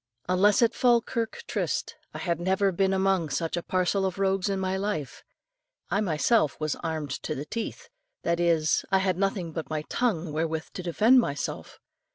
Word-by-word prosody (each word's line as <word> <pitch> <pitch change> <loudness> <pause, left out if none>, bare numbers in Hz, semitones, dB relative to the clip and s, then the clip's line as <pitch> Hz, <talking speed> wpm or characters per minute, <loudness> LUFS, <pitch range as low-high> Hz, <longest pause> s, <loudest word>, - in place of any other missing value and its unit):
Unless 195 +5 +4
at 230 0 +3
Falkirk 235 -2 +1
tryst, - - -2 0.2
I - - -7
had 170 -3 -1
never 190 +2 +2
been 190 +2 +1
among 190 -4 +1
such 165 +3 -1
a 175 - -2
parcel 185 +2 0
of 190 -1 -1
rogues 195 0 +1
in 195 -1 -1
my 190 0 -1
life. 190 - -3 0.7
I 200 +3 +2
myself 165 - +2
was 155 -1 -1
armed 155 -4 -4
to - - -3
the 140 - -5
teeth: 225 +7 -5 0.4
that 170 0 0
is, 165 -2 +2
I 190 - +5
had 190 -2 0
nothing 195 -4 -1
but 160 -3 -5
my 155 -1 -2
tongue 180 -10 0
wherewith 160 +1 -2
to - - -5
defend 215 +9 +4
myself. 145 -12 -3
185 Hz, 180 wpm, -27 LUFS, 160-195 Hz, 0.7 s, I